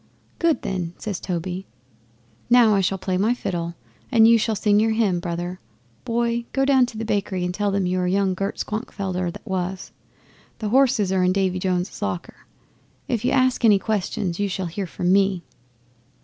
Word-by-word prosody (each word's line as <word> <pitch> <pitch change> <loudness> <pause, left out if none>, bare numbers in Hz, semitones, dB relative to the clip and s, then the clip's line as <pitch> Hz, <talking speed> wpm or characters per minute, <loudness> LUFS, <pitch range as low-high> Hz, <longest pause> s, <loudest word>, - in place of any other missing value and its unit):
'"Good, 335 -2 +1
then," 180 -3 -3
says 200 -4 -4
Toby. 180 +1 -4 0.8
"Now 235 -3 +6
I 195 - +3
shall 195 +1 0
play 185 -1 -2
my 225 +5 +2
fiddle 170 -6 -3 0.4
and 225 -3 +6
you 230 - +7
shall 220 0 0
sing 205 0 +3
your 220 +1 +2
hymn, 205 -6 +1
brother. 175 +1 -4 0.5
Boy, 235 0 0
go 270 0 +2
down 265 -3 +4
to 230 - -9
the 225 - -3
bakery 200 -4 -1
and 180 - -2
tell 205 +2 0
them 195 -1 0
you 180 +1 0
are 180 - 0
young 190 +1 +1
Gert 195 +2 -3
Schwankfelder 190 -5 -3
that - - -12
was. 190 0 -3 0.7
The 215 - -3
horses 245 -5 +3
are 190 -1 +2
in 180 0 +3
Davy 190 -1 0
jones's 180 +1 -2
locker. 180 -4 -5 0.6
If 235 -3 -1
you 250 - +2
ask 255 -2 +2
any 210 -3 +6
questions 195 -3 -2
you 205 -1 0
shall 190 0 -3
hear 180 +3 -4
from 180 +2 0
me." 195 -2 +2
195 Hz, 185 wpm, -23 LUFS, 180-220 Hz, 0.8 s, you